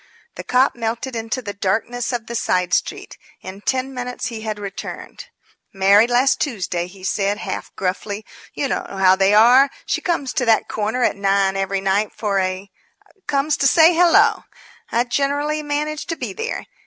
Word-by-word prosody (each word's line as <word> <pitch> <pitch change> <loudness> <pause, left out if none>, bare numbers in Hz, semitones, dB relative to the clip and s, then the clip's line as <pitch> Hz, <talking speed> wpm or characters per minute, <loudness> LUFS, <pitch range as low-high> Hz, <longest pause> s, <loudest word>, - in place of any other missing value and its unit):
The - - -8
cop 255 +2 +2
melted 235 +2 -3
into 230 +3 -3
the 205 - -5
darkness 225 +6 -2
of 240 -3 -3
the 235 - -7
side 180 -6 0
street. - - -2 0.2
In 190 +2 -9
ten 260 +3 -1
minutes 250 0 -4
he 225 -2 -7
had 215 -1 -4
returned. 200 - -8 0.5
"Married 200 +4 +4
last 250 +3 +2
Tuesday," 185 - -2
he 185 +1 -15
said, 200 +1 0
half - - -5
gruffly. 200 +3 -3 0.3
"You 280 - -1
know - - -3
how 190 -1 +4
they 195 +2 +3
are. 250 +6 +6 0.2
She - - -1
comes 330 -7 -1
to 250 - 0
that 225 -1 +3
corner 220 +4 -2
at - - +2
nine 195 -1 +1
every 195 0 -1
night 195 +2 0
for 200 -3 -1
a 185 +1 -3 0.6
comes 285 +2 +1
to 275 - +3
say 325 +4 +6
'hello!' 355 +5 +4 0.5
I 235 - +2
generally 285 +4 -1
manage 300 +1 -3
to 330 - -2
be - - -5
there. 455 +2 -4
225 Hz, 175 wpm, -20 LUFS, 195-270 Hz, 0.6 s, are